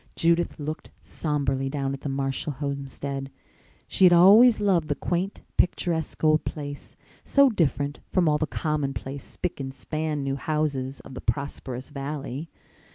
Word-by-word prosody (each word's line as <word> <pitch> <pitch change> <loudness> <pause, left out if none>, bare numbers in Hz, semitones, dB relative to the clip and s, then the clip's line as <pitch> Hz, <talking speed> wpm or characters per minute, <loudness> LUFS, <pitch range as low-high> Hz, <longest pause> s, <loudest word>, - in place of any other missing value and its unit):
Judith 170 0 +2
looked 155 +1 -5
sombrely 135 -3 -1
down 135 -1 -2
at 135 - -6
the 145 - -3
Marshall 135 +2 -2
homestead. 140 0 -4 0.6
She - - +1
had 175 - +8
always 210 +7 +8
loved 185 -6 +2
the 145 - 0
quaint, 180 +6 -2 0.2
picturesque 165 -3 0
old 155 0 +4
place, 145 -2 -6 0.3
so 280 -2 +5
different 145 -6 0
from 180 -3 +2
all 150 -1 +3
the 155 - 0
commonplace 140 -3 -3
spick 180 - -5
and 135 -1 -4
span 155 +1 -3
new 135 0 -1
houses 140 -2 -2
of - - -12
the 125 - -7
prosperous 135 -2 -3
valley. 140 +1 -5
145 Hz, 150 wpm, -26 LUFS, 135-165 Hz, 0.6 s, had